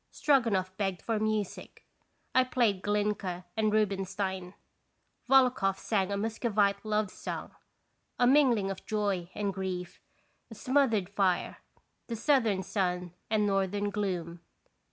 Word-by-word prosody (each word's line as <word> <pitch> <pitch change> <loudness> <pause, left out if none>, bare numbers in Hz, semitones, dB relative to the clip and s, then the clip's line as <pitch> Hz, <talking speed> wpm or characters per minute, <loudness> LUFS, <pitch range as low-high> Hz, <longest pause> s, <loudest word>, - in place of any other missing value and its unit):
Stroganoff 220 -10 +1
begged 195 -5 -2
for 225 -2 -1
music. 215 -2 -3 0.5
I 255 - +5
played 235 -7 +1
Glinka 205 -3 -1
and 215 -1 +1
Rubinstein. 195 -3 -1 0.7
Volokhoff 250 -8 +4
sang 195 -1 0
a 200 - -1
Muscovite 210 -2 0
love 215 -2 0
song, - - -6 0.7
a 245 - +3
mingling 245 -7 +4
of 195 - -7
joy 200 -5 -1
and 200 -1 -1
grief; 185 -2 -5 0.5
a 225 - -10
smothered 255 -7 +2
fire, 195 -2 0 0.5
the 235 - -3
southern 225 -6 +2
sun 180 -3 -2 0.2
and 215 -1 +2
northern 200 +1 0
gloom. 180 -5 -3
205 Hz, 120 wpm, -30 LUFS, 190-220 Hz, 0.7 s, I